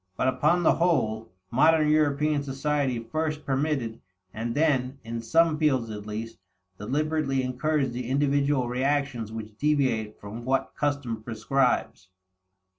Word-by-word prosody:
But, - - +1
upon 150 +7 +2
the - - +5
whole, 115 - 0 0.2
modern 155 +5 +4
European 150 -1 +2
society 140 -1 -1
first 150 +5 -3
permitted, 135 -5 -1 0.3
and 115 +1 -3
then, 135 -4 +1
in 115 0 -5
some 160 +6 +3
fields 130 -7 +1
at 105 0 -7
least, 110 +2 -6 0.4
deliberately 140 +3 0
encouraged 135 +1 0
the 125 0 -4
individual 140 -1 +2
reactions 130 -2 -1
which 110 -1 -8
deviate 130 -8 0
from 105 +3 -8
what 135 +2 0
custom 140 -6 -2
prescribes. 115 -2 0
135 Hz, 125 wpm, -26 LUFS, 115-150 Hz, 0.4 s, the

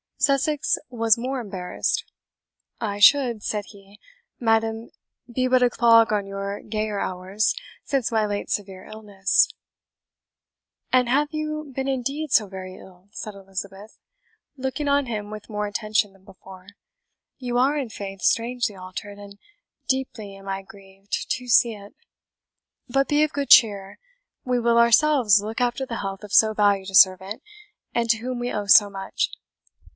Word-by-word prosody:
Sussex 280 +1 +1
was 230 -2 +2
more 260 +3 -3
embarrassed. 190 -6 -3 0.7
"I 205 -3 -3
should," 240 -2 +5
said 210 -1 -2
he, 200 0 -17 0.4
"madam, 225 0 0 0.4
be 255 +2 0
but 255 0 +3
a 245 - +4
clog 230 -2 +4
on 205 -2 0
your 195 +1 -5
gayer 215 -1 -3
hours, 190 +4 -1 0.3
since 270 -5 -1
my 220 -1 +1
late 205 0 -4
severe 190 -2 -4
illness." 205 -3 +1 1.4
"And 255 -1 +3
have 290 +4 +2
you 305 -1 -4
been 265 0 -2
indeed 275 +3 -3
so 215 -4 +4
very 185 -1 -8
ill?" 185 +1 -17
said 215 0 -7
Elizabeth, 195 +1 -9 0.6
looking 265 +3 -3
on 280 0 +2
him 210 -3 -4
with 215 +1 -9
more 210 -1 -3
attention 215 -1 -1
than 195 -1 -24
before; 190 -1 -15 0.7
"you 245 -3 -3
are, 270 +4 +3
in 275 -5 -3
faith, 195 -2 -8
strangely 230 -1 0
altered, 185 +2 -8
and 200 0 -12 0.5
deeply 255 -6 -3
am 195 0 -14
I 195 0 -3
grieved 195 0 -8
to 250 0 -3
see 235 -1 +4
it. 205 -1 -13 0.9
But 270 +3 +1
be 295 +1 +3
of 305 - -1
good 285 -1 -3
cheer 200 -4 +5 0.5
we 250 -1 +1
will 235 0 +2
ourselves 235 -3 +5
look 220 +4 -5
after 245 +2 0
the 230 -3 -5
health 195 0 -5
of 205 - -10
so 220 -1 +5
valued 200 -2 +1
a - - -3
servant, 190 +2 +4 0.5
and 235 -1 -1
to 225 - +1
whom 250 +2 -5
we 245 +1 -3
owe 205 -1 -3
so 205 0 +7
much. 195 -1 -3
215 Hz, 155 wpm, -23 LUFS, 200-250 Hz, 1.4 s, so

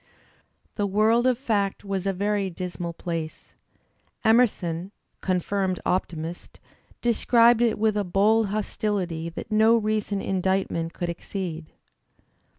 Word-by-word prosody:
The 205 -2 +1
world 220 +5 +3
of 250 -2 +2
fact 205 -6 -1
was 195 -1 -2
a - - +3
very 200 +1 -1
dismal 175 -1 -5
place. 165 -2 -6 0.7
Emerson, 200 -6 +2 0.3
confirmed 185 0 0
optimist, 170 -2 -3 0.4
describes 235 0 +4
it 235 -2 +2
with 215 0 +1
a 205 - +1
bold 205 +4 +3
hostility 195 -5 -2
that 170 - -8
no 220 +2 +5
recent 215 -2 -1
indictment 190 -3 -1
could 175 - -3
exceed. 170 -2 -5
195 Hz, 115 wpm, -25 LUFS, 175-215 Hz, 0.7 s, no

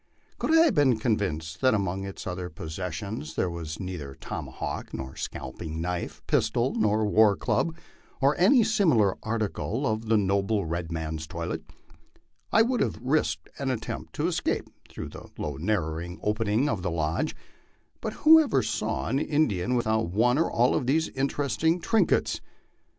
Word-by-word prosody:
Could - - 0
I - - +8
have 315 -7 +3
been 135 - +4
convinced 80 -9 -1
that 130 -3 +4
among 95 -1 -1
its 95 - -7
other 90 0 -4
possessions 85 +2 -5
there 90 - 0
was 80 -2 -6
neither 85 -8 -5
tomahawk - - -5
nor 65 0 -6
scalping 80 -1 -5
knife, 90 +1 -3
pistol - - +1
nor 110 0 +2
war 105 -1 +5
club, 165 +9 0 0.4
or 140 +2 +3
any 230 +7 +6
simi 205 - +3
lar 100 -4 +2
article 110 +3 -2
of 110 -1 -1
the 110 0 +4
noble 100 +1 +1
red 85 0 -3
man's 80 -1 -4
toilet, 85 0 -4 0.9
I 225 - +6
would 245 +1 0
have 115 - 0
risked 115 - 0
an 135 -1 -1
attempt 115 -4 -4
to - - 0
es - - 0
cape - - -1 0.2
through - - -7
the - - -11
low 75 -3 -4
narrow 85 -2 -2
opening 110 +4 +1
of 110 -9 -1
the 90 - -1
lodge; 80 -1 -1 0.7
but 220 -1 -3
who 320 +1 +10
ever 265 - +2
saw 110 0 -2
an 130 +4 +1
In 155 +1 +2
dian 105 +4 -1
without 110 -5 +1
one 120 - +3
or 165 - +2
all 120 +2 +3
of 130 - 0
these 160 +4 +2
interesting 145 +5 0
trinkets? 220 +5 +2
110 Hz, 165 wpm, -27 LUFS, 85-135 Hz, 0.9 s, who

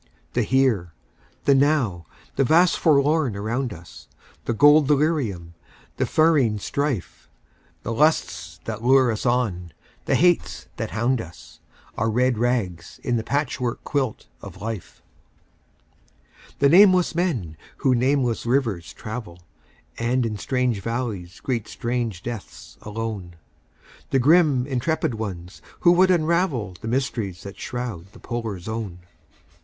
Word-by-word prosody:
The - - +1
Here, 120 -11 +1 0.5
the 140 - +5
Now, 135 - +1 0.3
the - - +3
vast 165 +7 +4
Forlorn 145 -4 +3
around 115 +5 -2
us; 85 -3 -12 0.4
The - - 0
gold 145 +4 +6
delirium, 135 - 0 0.4
the - - 0
ferine 150 -9 +3
strife; 140 - -3 0.5
The 115 - -3
lusts 90 - 0
that 110 0 -5
lure 130 -1 +5
us 110 +3 -3
on, 100 -9 -1 0.3
the - - +2
hates 175 0 +2
that - - -3
hound 120 +2 0
us; 85 -3 -13 0.4
Our 110 +2 +1
red 125 +1 +1
rags 105 -9 -2
in 120 - 0
the 115 - -1
patch 140 +2 -1
work 125 0 -3
quilt 135 -6 -2 0.2
of - - -10
Life. 110 -3 -7 1.5
The 140 - +4
nameless 185 +1 +6
men 140 - -1 0.2
who 130 - +2
nameless 125 -1 +1
rivers 115 -10 0
travel, 105 -6 -8 0.6
And 120 +2 +1
in 105 -2 -3
strange 125 -5 0
valleys 110 -6 -4
greet 120 -5 -2
strange 120 -6 -3
deaths 115 -4 -8
alone; 105 -5 -5 0.7
The 135 - +2
grim, 145 -2 +4
intrepid 135 +1 -1
ones 95 -5 -6 0.2
who 175 - +6
would 185 +2 +5
unravel 160 - +1
The - - -6
mysteries 115 -7 -2
that 100 0 -9
shroud 110 -7 -5
the 115 - -14
Polar 115 -5 -4
Zone. 105 -2 -5
120 Hz, 130 wpm, -23 LUFS, 105-140 Hz, 1.5 s, gold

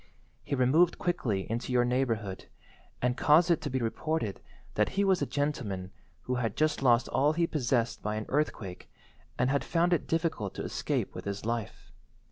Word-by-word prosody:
He - - -2
removed 145 +7 +4
quickly 120 - -1
into 115 +3 -3
your 125 -1 +3
neighbourhood, 115 -6 -1 0.6
and 125 0 +2
caused 160 +6 +5
it 170 - +2
to 145 - -3
be 130 - -1
reported 120 - -2 0.3
that - - +2
he 200 - +4
was 190 -2 +3
a - - 0
gentleman 110 -11 -2 0.3
who 125 - -2
had 115 -4 -2
just 155 -1 +1
lost 120 -2 +4
all 145 +3 +3
he 170 +1 +2
possessed 125 -6 0
by 105 0 -2
an 110 0 -3
earthquake 120 -10 -2 0.5
and 125 +2 +2
had 140 - +1
found 170 +1 +2
it 170 - 0
difficult 160 - -1
to - - -4
escape - - -2
with - - -8
his 100 +1 -4
life. 115 -2 -4
130 Hz, 180 wpm, -30 LUFS, 115-155 Hz, 0.6 s, caused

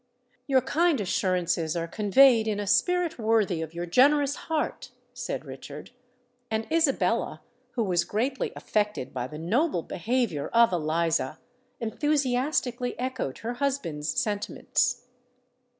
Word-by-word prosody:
"Your 265 -2 +4
kind 310 +3 +2
assurances 180 -4 0
are 170 -1 -2
conveyed 220 +4 +5
in 210 -1 -1
a 205 - -2
spirit 350 - +1
worthy 215 -6 +2
of 160 +1 -6
your 175 +1 -3
generous 280 - +4
heart," 310 -4 -2 0.2
said 245 -9 -4
Richard;—and 245 - -8
Isabella, 320 -4 +1 0.3
who 235 - 0
was 180 -4 +1
greatly 255 +6 -1
affected 210 -11 -2
by 125 -1 -3
the 150 - -9
noble 200 - 0
behaviour 225 - -1
of 235 -4 +4
Eliza, 160 -3 0 0.4
enthusiastically 255 -1 0
echoed 255 - -3
her 240 - -1
husband's 240 - -2
sentiments. 210 +3 -1
225 Hz, 120 wpm, -27 LUFS, 170-260 Hz, 0.4 s, conveyed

